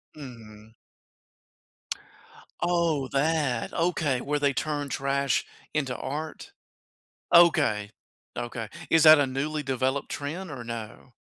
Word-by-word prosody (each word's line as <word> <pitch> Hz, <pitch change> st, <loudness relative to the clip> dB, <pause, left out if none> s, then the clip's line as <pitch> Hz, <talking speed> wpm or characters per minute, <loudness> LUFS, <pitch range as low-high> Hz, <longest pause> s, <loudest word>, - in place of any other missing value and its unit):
Mhm. 110 Hz, -6 st, -12 dB, 1.9 s
Oh, 170 Hz, -5 st, +1 dB
that, 140 Hz, -4 st, 0 dB
okay, 160 Hz, -7 st, 0 dB
where 145 Hz, +1 st, -1 dB
they 140 Hz, -1 st, +2 dB
turn 145 Hz, +1 st, -2 dB
trash 140 Hz, 0 st, 0 dB, 0.3 s
into 135 Hz, -5 st, -1 dB
art? 155 Hz, -, -5 dB, 0.8 s
Okay, 150 Hz, -12 st, +5 dB, 0.5 s
okay. 120 Hz, -2 st, -4 dB, 0.2 s
Is 165 Hz, -1 st, +5 dB
that 155 Hz, -1 st, +9 dB
a 140 Hz, -, +3 dB
newly 145 Hz, +3 st, -2 dB
developed 130 Hz, +1 st, -1 dB
trend 160 Hz, +5 st, -5 dB
or 130 Hz, -4 st, -6 dB
no? 115 Hz, +1 st, -8 dB
140 Hz, 105 wpm, -27 LUFS, 125-155 Hz, 1.9 s, that